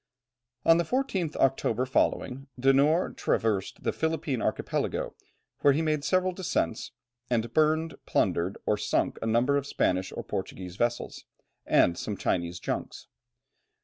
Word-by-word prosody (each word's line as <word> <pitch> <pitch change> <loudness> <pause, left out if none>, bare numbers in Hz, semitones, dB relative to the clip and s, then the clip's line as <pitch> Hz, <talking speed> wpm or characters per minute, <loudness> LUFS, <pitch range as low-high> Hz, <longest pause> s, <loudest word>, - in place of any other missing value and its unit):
On 165 - +7
the 170 - +2
14th 190 - -1
October 135 -1 +1
following, 135 +1 0
De 135 +2 +5
Noort 150 +6 +2
traversed 105 -4 0
the - - 0
Philippine 160 -5 -1
Archipelago, - - -1 0.5
where 140 - +5
he 155 +4 0
made 155 -2 0
several 185 +2 +2
descents, 175 - -2 0.4
and 120 -1 0
burnt, 155 0 +1
plundered, 90 +3 +1
or 105 - +2
sunk 105 - 0
a 115 - -2
number 120 +5 +3
of 140 0 -2
Spanish 95 -7 0
or - - -5
Portuguese 90 -1 -5
vessels, 120 +3 -2 0.4
and 85 -1 +4
some 105 -2 -4
Chinese 85 -1 -1
junks. - - -5
135 Hz, 140 wpm, -28 LUFS, 110-160 Hz, 0.5 s, On